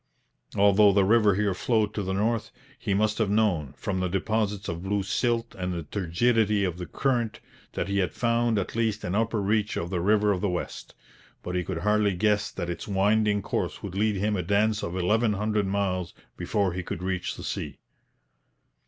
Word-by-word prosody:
Although 100 0 +5
the 100 -1 +4
river 105 -1 +4
here 100 -1 +1
flowed 105 +2 0
to 105 - -2
the 95 -1 -2
north, 110 +3 0 0.3
he 100 -4 -1
must 105 +2 +1
have 110 -3 +1
known, 95 -10 +1
from 100 -4 -2
the 90 - 0
deposits 105 +2 -1
of 85 0 -4
blue 100 +1 -1
silt 115 +3 0
and 90 -1 -3
the 85 -2 -3
turgidity 105 +5 +1
of 90 -2 -2
the 90 - -5
current, 120 -5 -1 0.3
that - - -2
he 100 0 0
had 90 - 0
found 115 -1 +1
at 100 - -3
least 110 -2 0
an 90 - -2
upper 110 +1 +1
reach 105 +1 0
of 85 +2 -3
the 90 -2 -1
River 105 +2 +3
of 95 -3 -1
the 100 - +1
West; 90 -1 -5 0.5
but 90 - -4
he 90 0 0
could 95 -1 -4
hardly 105 -2 +2
guess 105 +2 +1
that 85 - -5
its 85 - -5
winding 105 +1 +2
course - - -3
would 100 - -5
lead 105 +2 +1
him 105 +2 0
a 95 - 0
dance 105 +4 +1
of 85 +2 -4
eleven 105 +5 +2
hundred 105 0 0
miles 95 -3 -1 0.2
before 100 -4 0
he 95 - -3
should 85 - -5
reach 95 -1 -2
the - - -9
sea. - - -4
100 Hz, 200 wpm, -26 LUFS, 95-110 Hz, 0.5 s, Although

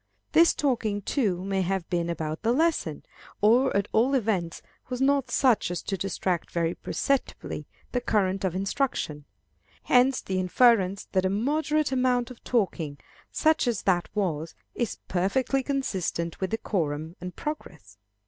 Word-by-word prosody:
This 335 +1 +5
talking, 225 -7 0
too, 195 -8 0
may 195 -1 0
have 190 -1 -1
been 170 -1 0
about 160 -1 -3
the 230 +1 +2
lesson, 295 - 0 0.4
or 235 +2 +4
at 200 0 0
all 250 +5 +3
events 200 -9 -1 0.3
was 250 -1 -3
not 275 -1 +2
such 245 -5 +3
as 175 - -4
to 195 - -2
distract 185 -2 -2
very 170 -1 0
perceptibly 275 +7 -2 0.2
the 245 - 0
current 195 -4 +1
of 185 -2 0
instruction. 190 - -2 0.6
Hence 255 +1 +4
the 190 -1 -2
inference 195 0 +3
that 185 -1 +2
a 190 - +2
moderate 295 +8 +1
amount 255 -1 +1
of 245 - -13
talking, 180 - -1 0.3
such 315 -4 +2
as 235 -5 0
that 175 -3 +1
was, 165 -6 -1 0.2
is 240 -4 -2
perfectly 220 +9 +1
consistent 190 - -2
with 190 - 0
decorum 160 -7 -2
and 180 0 -6
progress. 160 - -7
200 Hz, 150 wpm, -27 LUFS, 175-255 Hz, 0.6 s, This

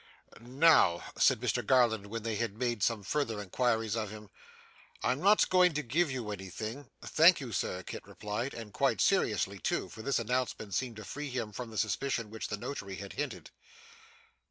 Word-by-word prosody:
'Now,' 125 - +4
said - - +4
Mr - - 0
Garland 115 -6 +3
when 115 +1 -5
they 115 0 -2
had 110 -1 -2
made 120 -3 -1
some 110 -1 +1
further 115 0 -1
inquiries 110 +2 0
of 110 -3 -2
him, 105 -1 -11 0.7
'I - - +3
am 130 +4 -2
not 205 +2 +5
going 180 -3 +4
to 150 - -1
give 155 +7 +1
you 125 -5 -4
anything 110 +7 -6
' - - -44
'Thank 170 +3 +6
you, 130 -5 -6
sir,' 90 -2 -2
Kit - - -8
replied; 105 +6 -4
and 110 -3 -8
quite - - +1
seriously - - +2
too, - - -1
for 110 - -10
this 135 +2 0
announcement 115 -3 -2
seemed 130 -3 -1
to 110 -1 -9
free 150 +5 -5
him 120 -4 -3
from 120 +3 -6
the 110 - -8
suspicion 115 0 -1
which 110 - -5
the 105 - -3
Notary 100 -4 -5
had 100 0 -8
hinted. 145 - -5
115 Hz, 190 wpm, -31 LUFS, 105-130 Hz, 0.7 s, Thank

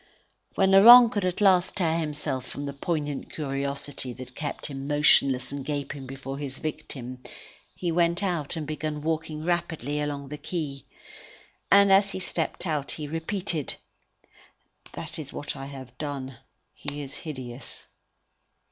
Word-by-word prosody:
When 190 -1 +4
Laurent 235 +5 +10
could 205 -5 0
at 180 +3 -1
last 185 -3 +4
tear 165 -4 +1
himself 150 -4 -3
from 145 - -6
the 140 - -4
poignant 145 -1 -3
curiosity 140 -2 -3
that 125 +1 -10
kept 145 +2 -4
him 135 -1 -5
motionless 140 -3 +4
and 140 -1 -4
gaping 140 -1 -4
before 135 +1 -6
his 135 -2 -3
victim, 130 -5 -6 0.5
he 175 -2 -2
went 170 +2 +2
out 175 -5 -1
and 160 -2 -3
begun 155 0 -3
walking 155 -1 -2
rapidly 160 -5 -1
along 140 -2 -3
the 150 0 -6
quay. 145 -4 -4 0.8
And 200 0 +7
as 195 0 +4
he - - -3
stepped 185 - -2
out, 150 -5 -1
he 150 -2 -5
repeated: 165 0 -2 1.2
"That - - -6
is 145 -2 -6
what 145 - -5
I 135 -1 -6
have 130 -3 -10
done. 135 -4 -5 0.3
He 145 0 -5
is 135 -1 -6
hideous." 130 -5 -6
150 Hz, 145 wpm, -27 LUFS, 140-170 Hz, 1.2 s, Laurent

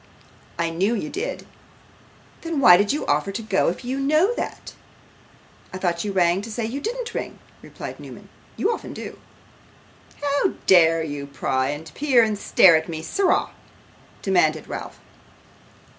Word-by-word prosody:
'I 170 -1 -1
knew 195 +8 0
you 215 - -4
did.' 440 +7 -4 1.0
'Then 330 -3 -3
why 180 -10 +8
do 205 +3 +2
you 300 - -3
offer 150 +7 0
to 210 - -4
go 200 -3 +1
if 180 +8 -6
you 260 +2 -2
know 310 +10 +3
that?' - - -6 1.0
'I - - -6
thought 175 -2 -1
you 205 - -3
rang 180 -1 +2
to 220 - -8
say 225 +1 -3
you 260 +6 -4
didn't 475 +1 -4
ring,' - - -5 0.2
replied - - -9
Newman. - - -11 0.3
'You 430 - +1
often - - -7
do.' - - -8 1.0
'How 285 +6 0
dare 165 -3 +5
you 145 -2 -5
pry, 130 -1 -1
and 145 +1 -6
peer, 265 - +3
and 215 -1 0
stare 185 -3 +5
at 160 +1 -1
me, 160 -1 -5
sirrah?' 385 - +1 0.7
demanded 160 -5 +1
Ralph. - - -7
195 Hz, 160 wpm, -23 LUFS, -, 1.0 s, why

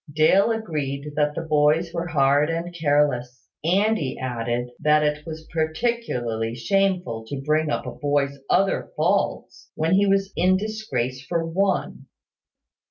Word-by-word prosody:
Dale 155 +8 +4
agreed 150 -9 -3
that 150 0 +1
the 165 - -3
boys 155 +2 +2
were 170 0 -2
hard 145 -1 +3
and 170 +1 -3
careless; 145 -6 0 0.2
and 200 +7 +2
he 135 -4 -3
added 120 -1 -3
that 150 0 +3
it 150 +1 -1
was 160 0 -7
particularly 155 - -1
shameful 180 -3 0
to 140 +3 -5
bring 155 +1 +1
up - - -2
a - - -4
boy's 140 -1 -1
other 195 0 +1
faults - - -1
when 160 +3 +1
he 200 +1 +4
was 195 0 +1
in 185 +2 +3
disgrace 195 - -3
for 165 +4 -1
one. 190 +3 -1
155 Hz, 145 wpm, -23 LUFS, 140-180 Hz, 0.2 s, Dale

